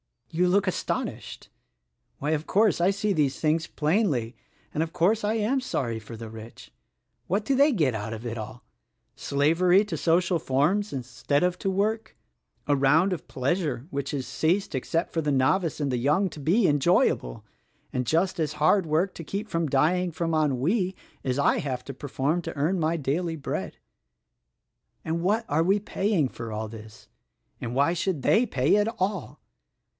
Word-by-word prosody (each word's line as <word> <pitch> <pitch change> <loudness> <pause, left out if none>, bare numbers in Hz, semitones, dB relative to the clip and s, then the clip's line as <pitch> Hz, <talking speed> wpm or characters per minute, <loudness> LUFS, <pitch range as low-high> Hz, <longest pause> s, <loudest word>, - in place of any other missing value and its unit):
You 180 +3 +2
look 200 +2 +3
astonished! 185 - -4 0.7
Why, 145 +2 -2
of 155 0 -1
course, 210 -2 +3
I 180 - +4
see 200 +1 0
these 145 -5 0
things 160 +2 +1
plainly, 150 - 0 0.4
and, 150 - -1
of 165 +1 -2
course 195 +6 +2
I 210 - +1
am 225 +5 +1
sorry 120 - -2
for 110 +2 -10
the 115 0 -8
rich. 110 +1 -11 0.6
What 200 +4 0
do 275 - 0
they 280 +2 +4
get 150 - +2
out 110 +1 -4
of 110 +2 -7
it 115 0 -4
all? 110 +2 -8 0.5
Slavery 170 +7 +3
to 180 -6 -4
social 170 +2 +2
forms 165 +10 +1
instead 130 +3 -1
of 180 0 0
to 195 - -1
work; 215 +4 -1 0.5
a 145 - +2
round 150 +8 +3
of 175 - -6
pleasure 135 -2 -1
which 140 -2 -3
has 135 -3 -3
ceased, 160 - 0
except 165 +6 -1
for 165 - -1
the 150 -2 0
novice 155 +6 +1
and 140 -2 0
the 125 - 0
young, 150 +10 +2
to 155 - -10
be 185 - +2
enjoyable, 145 - +2 0.5
and 125 -1 -2
just 170 +3 +1
as 150 -2 0
hard 160 +4 +3
work 165 +5 +1
to 165 - -8
keep 205 +6 -4
from 165 -1 0
dying 170 +6 +2
from 165 0 -2
ennui 160 - +1 0.3
as 130 -1 0
I 140 - +3
have 130 -3 -3
to 140 - -6
perform 145 +5 -1
to 165 - -6
earn 160 +6 0
my 160 +1 +1
daily 160 +4 -1
bread. 150 - -4 1.3
"And 165 +1 -1
what 215 +6 +1
are 155 +3 +2
they 195 +4 +3
paying 195 -7 0
for 115 -3 -7
all 110 0 -4
this? 110 -1 -12 0.3
— - - -43
and 120 +1 -4
why 140 +5 +3
should 170 -4 -2
they 235 +3 +4
pay 135 - +2
at 210 +1 +2
all? 190 -4 -2
160 Hz, 180 wpm, -26 LUFS, 135-185 Hz, 1.3 s, I